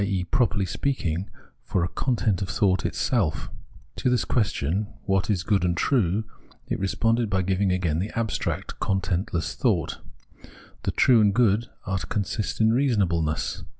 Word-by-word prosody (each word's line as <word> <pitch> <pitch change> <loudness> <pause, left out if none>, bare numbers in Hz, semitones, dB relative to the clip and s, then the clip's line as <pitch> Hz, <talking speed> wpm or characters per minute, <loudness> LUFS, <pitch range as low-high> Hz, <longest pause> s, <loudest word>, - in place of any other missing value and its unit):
e. 95 -2 0
properly 105 +1 +1
speaking, 90 - -2 0.3
for 90 - 0
a - - +1
content 110 -7 0
of 95 - -3
thought 95 -3 +2
itself. 100 - 0 0.5
To - - +1
the 125 -1 +1
question 100 - 0 0.2
what 95 +1 0
is 95 -4 +1
good 100 -3 +1
and 85 -2 +1
true, 110 -5 +2 0.4
it - - -2
responded 115 +4 +1
by 95 -1 +1
giving 95 +1 +1
again 85 -4 0
the 100 +4 -2
abstract, 115 -3 -2
contentless 95 -2 -1
thought; - - 0 0.8
the - - 0
true 120 -3 +5
and 105 -1 +3
good 115 -1 +3 0.2
are 95 -1 -1
to - - -6
consist 105 0 -2
in 110 0 +4
reasonableness. 95 - +1
100 Hz, 150 wpm, -25 LUFS, 90-110 Hz, 0.8 s, true